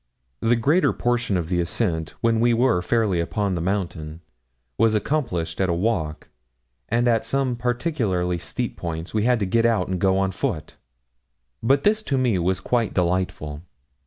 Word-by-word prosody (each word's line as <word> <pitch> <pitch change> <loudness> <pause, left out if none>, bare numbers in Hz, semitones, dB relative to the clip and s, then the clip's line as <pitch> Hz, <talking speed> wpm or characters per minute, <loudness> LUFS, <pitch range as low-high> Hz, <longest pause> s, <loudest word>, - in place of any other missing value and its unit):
The 115 - +3
greater 145 +11 +3
portion 120 -5 0
of 85 -2 -3
the 90 -1 +1
ascent, 85 -3 -2
when 115 -1 +2
we 120 0 +3
were 120 -6 +3
fairly 100 -1 +1
upon 100 +3 -1
the 85 - -2
mountain, 85 -4 -3 0.5
was 110 - +3
accomplished 95 - -1
at 95 - +2
a 85 - +1
walk, 85 -6 -1 0.6
and 120 +2 +2
at 115 -2 +3
some 135 -2 0
particularly 120 - -1
steep - - -4
points 80 0 -5
we 110 0 +1
had 125 -1 +3
to - - +2
get 115 +5 +2
out 115 -6 +2
and 95 -1 -1
go 95 -1 +3
on 95 0 +1
foot. 95 - -3 0.9
But 135 +5 +3
this 215 +1 +3
to 135 - +2
me 120 -7 +2
was 95 +2 0
quite 115 +3 0
delightful. 85 -5 -1
100 Hz, 170 wpm, -23 LUFS, 90-120 Hz, 0.9 s, The